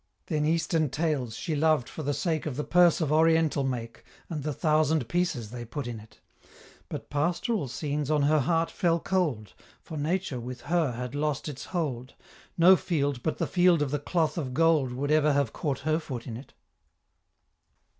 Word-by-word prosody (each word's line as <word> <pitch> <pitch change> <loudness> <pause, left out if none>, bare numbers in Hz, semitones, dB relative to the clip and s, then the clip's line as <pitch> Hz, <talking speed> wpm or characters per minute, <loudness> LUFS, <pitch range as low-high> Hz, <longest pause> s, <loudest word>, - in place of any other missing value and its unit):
Then 150 -3 -1
Eastern 160 -1 +1
Tales 140 -7 -1
she 160 - -3
loved 155 -4 +2
for - - -7
the 145 -1 -1
sake 160 -4 -1
Of 140 - -3
the 150 - -1
Purse 175 0 +4
of 155 -2 0
Oriental 160 -2 +3
make, 120 -3 -4 0.3
And 155 -3 -3
the 150 +2 -2
thousand 155 -2 +1
pieces 140 -10 -1
they 120 -1 -6
put 125 +4 -5
in 120 -2 -5
it 110 +1 -17 0.7
But - - -7
Pastoral 170 - 0
scenes 145 +2 -3
on 150 -2 +2
her 155 +2 +4
heart 165 +4 +1
fell 170 -3 +1
cold, 150 - -1 0.3
For 160 - -8
Nature 160 -3 -1
with 125 +1 -7
her 165 -6 0
had 125 +1 -5
lost 145 0 -1
its 140 -3 -6
hold, 135 -8 -3 0.4
No 180 +3 +8
field 145 -8 -1
but 155 - -2
the - - 0
Field 175 -4 +3
of 135 - -3
the 145 - 0
Cloth 165 +3 0
of 130 -5 -4
Gold 160 -5 +3
Would 140 +4 -2
ever 155 -1 +4
have 140 -5 0
caught 140 -4 -2
her 155 +2 +1
foot 130 -7 -6
in 115 - -6
it. 130 +5 -11
150 Hz, 185 wpm, -28 LUFS, 130-165 Hz, 0.7 s, No